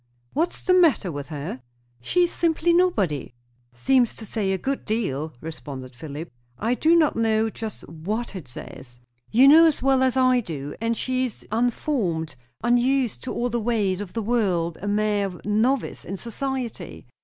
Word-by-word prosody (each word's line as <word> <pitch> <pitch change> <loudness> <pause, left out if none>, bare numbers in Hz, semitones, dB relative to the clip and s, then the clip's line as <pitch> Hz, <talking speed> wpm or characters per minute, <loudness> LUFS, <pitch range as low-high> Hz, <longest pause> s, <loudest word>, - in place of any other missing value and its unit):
"What's 335 +2 -1
the 370 - +2
matter 320 - +4
with 145 -2 -6
her?" 145 -4 -6 0.4
"She 355 - +2
is 350 - +1
simply 335 0 +1
nobody." 205 - +1 0.4
"Seems 245 - +2
to 220 - -9
say 205 -2 -1
a 190 - +1
good 275 +8 -3
deal," 160 - -2
responded 135 -5 -8
Philip. 150 +5 -7 0.3
"I 230 +3 0
do 320 +6 +3
not 315 -3 +3
know 225 -1 +1
just 220 -1 -7
what 200 +9 -4
it 170 -8 -7
says." 120 0 -9 0.3
"You 255 +5 +6
know 325 +3 +9
as 300 -5 0
well 270 -1 +3
as 260 0 +2
I 255 -1 +4
do! 145 - -5
And 230 0 0
she 255 0 0
is 245 - -8
unformed; 220 - -1 0.3
unused 245 +1 +2
to - - -3
all 245 +1 -1
the 235 0 -1
ways 210 -5 0
of 200 -3 -7
the 225 - -2
world; 185 -8 0
a 205 - -4
mere 205 -3 0
novice 225 +6 0
in 195 - -5
society." 235 - -5
220 Hz, 170 wpm, -24 LUFS, 170-260 Hz, 0.4 s, know